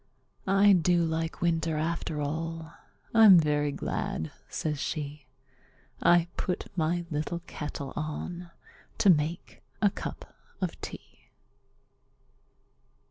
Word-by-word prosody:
"I 195 +1 +6
do 175 -1 +3
like 160 0 -2
winter 165 -2 +1
after 160 -1 -2
all; 160 +2 -4 0.4
I'm 220 -5 +9
very 150 -2 +2
glad," 80 - -3 0.2
says 150 -2 -2
she, 145 -3 -4 0.7
"I 175 -1 +5
put 180 - -2
my 170 +1 0
little 155 +3 -2
kettle 145 -4 -6
on 170 +3 -4 0.5
to 195 - +6
make 160 +2 -1 0.2
a 205 -2 +4
cup - - -7 0.3
of - - -3
tea!" - - -10
165 Hz, 105 wpm, -29 LUFS, 150-175 Hz, 0.7 s, I'm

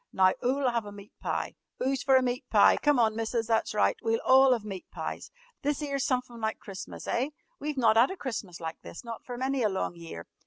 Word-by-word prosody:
Now 185 0 +4
'oo'll 265 +2 +1
'ave 235 -3 0
a - - -10
meat 205 0 -12
pie? - - -2 0.3
'Oo's 265 0 0
fer 270 -1 +4
a 260 - +5
meat 250 +2 -2
pie? - - +6
Come 295 -2 +3
on, 220 -2 +3
Missus! 225 +1 -1
That's 225 -1 0
right. 210 - +3
We'll 225 0 +1
all 265 0 +7
'ave 215 -3 -7
meat 190 -3 -7
pies! - - -5 0.3
This 290 0 0
'ere's 275 -2 -1
sumfin 250 -3 -2
like 220 0 -1
Christmas, 195 -1 -8
eh? 255 +4 0 0.3
We've 295 0 -3
not 225 -3 +4
'ad 240 +4 +6
a 380 - -6
Christmas 215 - -5
like 165 -1 -6
this - - -10
not 230 -1 -7
for 245 -1 -7
many 265 +1 0
a 215 - +3
long 190 -2 -2
year. 165 - -8
235 Hz, 230 wpm, -29 LUFS, 210-265 Hz, 0.3 s, all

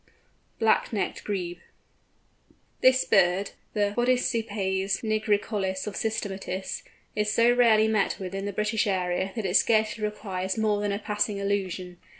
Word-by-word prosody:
BLACK 225 -1 +2
NECKED 210 -4 -2
GREBE. 180 -4 -3 1.2
This 260 0 +5
bird, 190 +1 +3 0.2
the 205 -1 +1
Podicipes 220 -6 0
nigricollis 210 -3 0
of 210 - -4
systematists, 195 -4 -3 0.3
is 210 0 +1
so 235 +2 +4
rarely 225 -3 +5
met 215 -2 +1
with 190 -1 -6
in 195 0 -3
the 205 - -2
British 210 +2 0
area, 185 0 0
that 220 -4 -3
it 185 0 0
scarcely 220 -1 +2
requires 190 -3 -3
more 210 -2 +1
than 205 -1 0
a 200 - -1
passing 210 -1 -1
allusion. 185 -3 -2
205 Hz, 140 wpm, -27 LUFS, 190-220 Hz, 1.2 s, This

